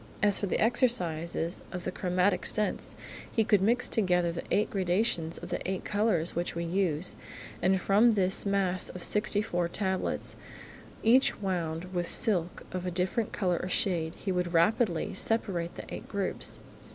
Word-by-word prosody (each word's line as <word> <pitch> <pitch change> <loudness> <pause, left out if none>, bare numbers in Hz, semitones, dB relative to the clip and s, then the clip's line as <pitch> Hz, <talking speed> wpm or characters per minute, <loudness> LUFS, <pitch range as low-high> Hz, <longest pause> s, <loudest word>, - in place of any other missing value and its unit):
As 205 -2 +4
for 200 - -2
the - - -1
exercises 175 - +1
of 180 -1 -5
the 185 - -3
chromatic 180 0 0
sense, 215 -1 0 0.4
he 225 - +2
could 205 -3 +3
mix 235 +5 +2
together 180 -5 +1
the 170 - -5
eight 210 +4 +1
gradations 180 -4 0
of - - -9
the - - -3
eight 190 -1 -3
colours 205 -6 0
which 175 0 -2
we 170 - -2
use, 170 -2 0 0.5
and 190 +1 +3
from 210 +5 +4
this 190 -2 +3
mass 195 -2 0
of 180 - -7
sixty 210 0 +3
four 175 -5 -1
tablets, 190 +1 -2 0.7
each 250 +4 +4
wound 180 -2 -3
with 175 -1 -1
silk 180 -6 +1
of 185 0 -4
a - - +1
different 185 +5 -1
colour 180 -3 0
or 185 - -4
shade, 170 -3 0
he 195 - -4
could 180 -1 -1
rapidly 170 +1 +2
separate 185 -7 -1
the - - -8
eight - - -8
groups. 200 -2 0
185 Hz, 165 wpm, -29 LUFS, 175-205 Hz, 0.7 s, As